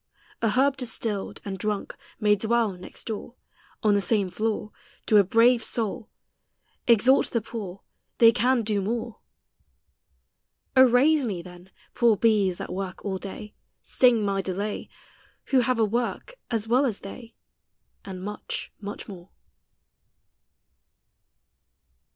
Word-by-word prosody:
A 225 - +2
herb 265 +4 +2
destilled, 225 -5 -3
and 195 -2 -5
drunk, 210 0 -3 0.2
may 210 0 +4
dwell 225 +1 +1
next 180 -1 -9
doore, 225 +2 -6 0.5
On 210 -1 +4
the 200 - +2
same 200 -3 +1
floore, 215 0 -2 0.3
To 215 - +4
a 205 - +7
brave 230 +4 +4
soul: 225 0 -2 0.8
Exalt 240 +3 +5
the 230 - 0
poore, 200 -4 -7 0.4
They 230 -1 +7
can 245 +1 +2
do 210 -1 0
more. 230 +3 -3 1.6
O, 260 -1 +7
raise 285 +5 +4
me 195 -8 -3
then! 180 +1 -13 0.2
poore 235 -3 +3
bees, 200 -5 +2
that - - -6
work 190 0 -6
all 190 -2 -2
day, 205 +2 -8 0.3
Sting 240 -4 +3
my 195 -1 0
delay, 200 +3 -4 0.6
Who 265 - +5
have 250 0 +1
a 225 - +3
work, 240 - -3 0.2
as 225 -2 -1
well 255 +4 +3
as 215 -5 -4
they, 230 +4 -10 0.7
And 185 -2 -8
much, 210 +1 -5
much 205 +1 -7
more. 185 -3 -11
215 Hz, 135 wpm, -25 LUFS, 195-235 Hz, 1.6 s, a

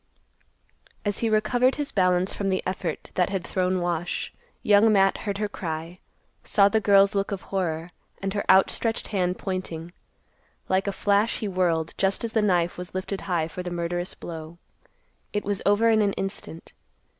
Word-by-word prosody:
_ - - -26 0.2
As 205 -2 0
he 230 - +1
recovered 240 +4 +2
his 290 -1 -3
balance 185 -1 +2
from 200 -1 -2
the 185 -1 0
effort 180 -3 -4
that 180 0 +1
had 190 -2 -3
thrown 185 -1 0
Wash, 175 0 -2 0.3
Young 210 +2 +5
Matt 195 -2 +4
heard 200 - -1
her 210 0 -1
cry, 165 -3 -5 0.5
saw 200 -1 +4
the 220 +2 +2
girl's 200 0 +5
look 200 +1 -1
of 195 -2 -4
horror, 170 -4 -2 0.3
and 195 0 -3
her 200 - -1
outstretched 195 +4 +3
hand 180 -3 0
pointing. 175 -3 -5 0.7
Like 190 +2 +1
a - - +1
flash 205 +3 +1
he 215 - -3
whirled 175 -4 0
just 195 +3 +1
as 230 -1 -3
the 220 - +3
knife 175 -4 +1
was 180 +1 -8
lifted 190 +1 -3
high 165 -3 +1
for 180 - -6
the 180 - -4
murderous 175 +1 -3
blow. 165 0 -8 0.8
It 210 - -1
was 200 -1 -2
over 220 +3 +4
in 220 -1 +4
an 200 -1 +2
instant. 195 -4 -5
190 Hz, 180 wpm, -25 LUFS, 175-205 Hz, 0.8 s, Young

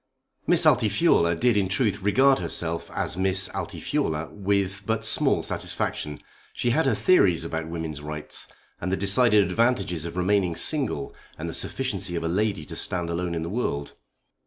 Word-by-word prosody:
Miss - - +4
Altifiorla 85 0 +3
did 120 +5 +2
in 100 -2 +1
truth 105 -1 0
regard 130 +7 +4
herself 85 0 -2
as - - -3
Miss 95 0 +2
Altifiorla 80 +1 -3
with 100 -1 -1
but 110 0 -1
small 110 - +3
satisfaction. 75 -1 -3 0.4
She 120 - 0
had 160 +7 +2
her - - +2
theories 90 - +3
about 80 -1 -4
women's 80 -3 -5
rights, 75 0 -6 0.3
and 90 - -2
the 95 - +1
decided 105 +2 +5
advantages 115 -10 0
of 85 - -8
remaining 90 -2 +1
single, 135 - -1 0.2
and - - -5
the - - -5
sufficiency 85 - -2
of 85 - -2
a - - -1
lady 100 -2 -1
to - - -8
stand 85 -2 -3
alone 85 0 -2
in 80 - -2
the - - -4
world. 80 -10 -3
95 Hz, 165 wpm, -25 LUFS, 85-105 Hz, 0.4 s, decided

